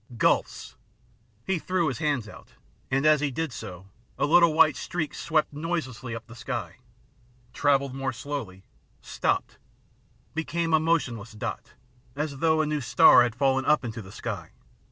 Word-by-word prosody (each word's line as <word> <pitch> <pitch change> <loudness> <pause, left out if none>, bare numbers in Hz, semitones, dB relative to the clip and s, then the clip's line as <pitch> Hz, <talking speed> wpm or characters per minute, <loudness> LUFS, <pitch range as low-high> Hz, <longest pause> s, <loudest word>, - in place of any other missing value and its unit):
Gulfs! - - 0 0.3
" 115 -1 -37
He 190 -3 0
threw 180 -1 0
his 135 -5 -3
hands 145 -8 0
out, - - -14 0.3
and 135 +2 +1
as 155 -2 +5
he 150 - +1
did 155 +1 -3
so, 95 -4 -8 0.3
a - - +1
little 170 +2 +5
white 155 -1 +5
streak 175 -4 -3
swept 155 -1 0
noiselessly 145 -7 -4
up 115 - -8
the 120 - -13
sky, 120 - -5 0.8
travelled 140 -2 +2
more 135 0 -2
slowly, 120 -8 -6 0.4
stopped, - - -2 0.7
became 165 +1 -1
a 160 - +6
motionless 125 -10 -1
dot, 105 - -6 0.4
as 145 -1 -3
though 160 0 +3
a - - 0
new 150 -1 -1
star 120 0 +7
had 120 -2 +1
fallen 135 0 +2
up 150 -2 +2
into 115 0 -5
the 95 -2 -12
sky. 100 -6 -6
140 Hz, 160 wpm, -26 LUFS, 115-155 Hz, 0.8 s, star